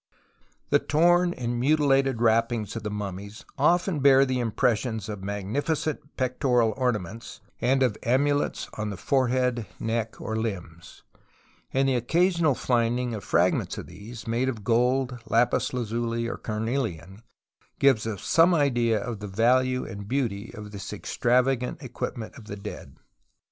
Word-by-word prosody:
The -, -, +5 dB
torn 175 Hz, +3 st, +3 dB
and 120 Hz, -1 st, -2 dB
mutilated 135 Hz, -3 st, +2 dB
wrappings 115 Hz, -2 st, +1 dB
of 115 Hz, -, -3 dB
the 105 Hz, -, -4 dB
mummies 100 Hz, 0 st, -6 dB
often 175 Hz, +3 st, +2 dB
bear 135 Hz, 0 st, +6 dB
the 130 Hz, -1 st, -1 dB
impressions 115 Hz, -2 st, 0 dB
of 105 Hz, -3 st, -6 dB
magnificent 140 Hz, -, -3 dB
pectoral 125 Hz, -3 st, +1 dB
ornaments, 115 Hz, -4 st, -3 dB, 0.2 s
and 135 Hz, +1 st, +2 dB
of 120 Hz, -5 st, 0 dB
amulets 145 Hz, +4 st, +1 dB
on 105 Hz, 0 st, -2 dB
the 100 Hz, -, -5 dB
forehead, 125 Hz, 0 st, +1 dB
neck, 115 Hz, 0 st, -2 dB
or 110 Hz, -, -4 dB
limbs; 90 Hz, -7 st, -5 dB, 0.7 s
and 135 Hz, +1 st, +2 dB
the 135 Hz, -, +2 dB
occasional 165 Hz, +4 st, +2 dB
finding 120 Hz, 0 st, 0 dB
of 105 Hz, -3 st, -5 dB
fragments -, -, +1 dB
of -, -, -6 dB
these, 105 Hz, +6 st, -10 dB
made 120 Hz, +3 st, 0 dB
of 110 Hz, -5 st, -5 dB
gold, 125 Hz, +3 st, +1 dB
lapis 115 Hz, +2 st, +2 dB
lazuli, 115 Hz, -1 st, -2 dB
or -, -, -4 dB
carnelian, 110 Hz, -4 st, -3 dB, 0.6 s
gives 130 Hz, -6 st, +3 dB
us 105 Hz, -4 st, -5 dB
some 170 Hz, +2 st, +4 dB
idea 120 Hz, -7 st, +2 dB
of 115 Hz, 0 st, -5 dB
the 105 Hz, -, -6 dB
value 125 Hz, +5 st, +2 dB
and 100 Hz, 0 st, -8 dB
beauty 115 Hz, -5 st, -2 dB
of 105 Hz, -1 st, -9 dB
this 100 Hz, -1 st, -7 dB
extravagant 125 Hz, +1 st, 0 dB
equipment 115 Hz, -3 st, -5 dB
of 110 Hz, -, -14 dB
the 100 Hz, -, -6 dB
dead. 100 Hz, -, -8 dB
120 Hz, 145 wpm, -26 LUFS, 110-130 Hz, 0.7 s, bear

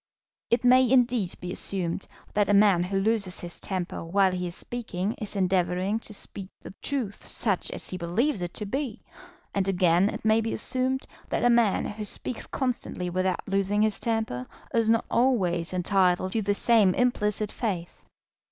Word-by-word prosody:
It 235 Hz, -, +2 dB
may, 255 Hz, 0 st, +5 dB
indeed, 245 Hz, -7 st, +3 dB
be 180 Hz, -, -5 dB
assumed 185 Hz, -2 st, -1 dB, 0.3 s
that 205 Hz, 0 st, +2 dB
a 205 Hz, -, +5 dB
man 200 Hz, -4 st, +5 dB
who 195 Hz, +1 st, -1 dB
loses 200 Hz, -3 st, +1 dB
his 175 Hz, -1 st, -5 dB
temper 185 Hz, -4 st, -4 dB
while 190 Hz, +3 st, +2 dB
he 180 Hz, -1 st, -3 dB
is 175 Hz, -, -4 dB
speaking 220 Hz, -4 st, -3 dB
is 210 Hz, -1 st, -5 dB
endeavouring 185 Hz, +2 st, +1 dB
to 225 Hz, -, -6 dB
speak 195 Hz, -2 st, -4 dB
the -, -, -10 dB
truth 250 Hz, -8 st, -3 dB
such 200 Hz, -5 st, 0 dB
as -, -, -5 dB
he 185 Hz, -, -1 dB
believes 200 Hz, -, 0 dB
it 175 Hz, 0 st, -5 dB
to 210 Hz, -, -3 dB
be, 255 Hz, +1 st, -4 dB, 0.5 s
and 195 Hz, -1 st, 0 dB
again 180 Hz, 0 st, +3 dB
it -, -, -7 dB
may 220 Hz, +1 st, +4 dB
be 225 Hz, 0 st, -2 dB
assumed 260 Hz, +4 st, -1 dB, 0.2 s
that -, -, 0 dB
a 245 Hz, -, +5 dB
man 235 Hz, -4 st, +3 dB
who 210 Hz, +1 st, -5 dB
speaks 230 Hz, +3 st, -3 dB
constantly 240 Hz, -8 st, -2 dB
without 185 Hz, 0 st, -1 dB
losing 195 Hz, +1 st, +1 dB
his 215 Hz, -2 st, 0 dB
temper 220 Hz, -, -2 dB, 0.3 s
is 230 Hz, -1 st, +2 dB
not 230 Hz, 0 st, +3 dB
always 185 Hz, -10 st, +1 dB
entitled 185 Hz, 0 st, +2 dB
to 225 Hz, -, 0 dB
the 205 Hz, 0 st, 0 dB
same 215 Hz, -5 st, +4 dB
implicit 215 Hz, -4 st, +1 dB
faith. 185 Hz, -8 st, -4 dB
200 Hz, 175 wpm, -27 LUFS, 185-230 Hz, 0.5 s, may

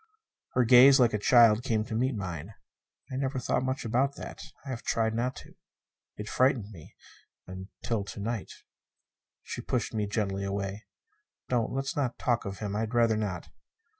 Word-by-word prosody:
Her 125 Hz, -, +3 dB
gaze 130 Hz, +3 st, +8 dB
like 120 Hz, -3 st, +4 dB
a 105 Hz, -, 0 dB
child 115 Hz, 0 st, +6 dB
came 115 Hz, -4 st, 0 dB
up 110 Hz, -, -5 dB
to -, -, -4 dB
meet 130 Hz, +2 st, 0 dB
mine. 95 Hz, 0 st, -6 dB, 0.6 s
"I 130 Hz, -, -3 dB
never 135 Hz, 0 st, -1 dB
thought 125 Hz, -, 0 dB
much 130 Hz, +1 st, -2 dB
about 130 Hz, +5 st, +1 dB
that. -, -, -8 dB, 0.2 s
I -, -, -7 dB
have 125 Hz, -3 st, -4 dB
tried 110 Hz, -1 st, 0 dB
not 120 Hz, +3 st, -1 dB
to. -, -, -12 dB, 0.6 s
It 105 Hz, -, -6 dB
frightened 125 Hz, -5 st, +1 dB
me 80 Hz, -7 st, -13 dB, 0.5 s
until 95 Hz, +4 st, -5 dB
to 100 Hz, -, -8 dB
night." 110 Hz, 0 st, -3 dB, 0.9 s
She -, -, -6 dB
pushed -, -, -2 dB
me 105 Hz, -2 st, -1 dB
gently 100 Hz, -2 st, -2 dB
away. 100 Hz, +1 st, -4 dB, 0.6 s
"Don't. 120 Hz, -3 st, 0 dB
Let's 135 Hz, +5 st, -2 dB
not 135 Hz, -5 st, -1 dB
talk 120 Hz, -1 st, 0 dB
of 100 Hz, 0 st, -5 dB
him. 105 Hz, -1 st, -4 dB
I'd 110 Hz, +2 st, -2 dB
rather 115 Hz, -2 st, +4 dB
not." 105 Hz, -5 st, -3 dB
115 Hz, 175 wpm, -29 LUFS, 105-125 Hz, 0.9 s, gaze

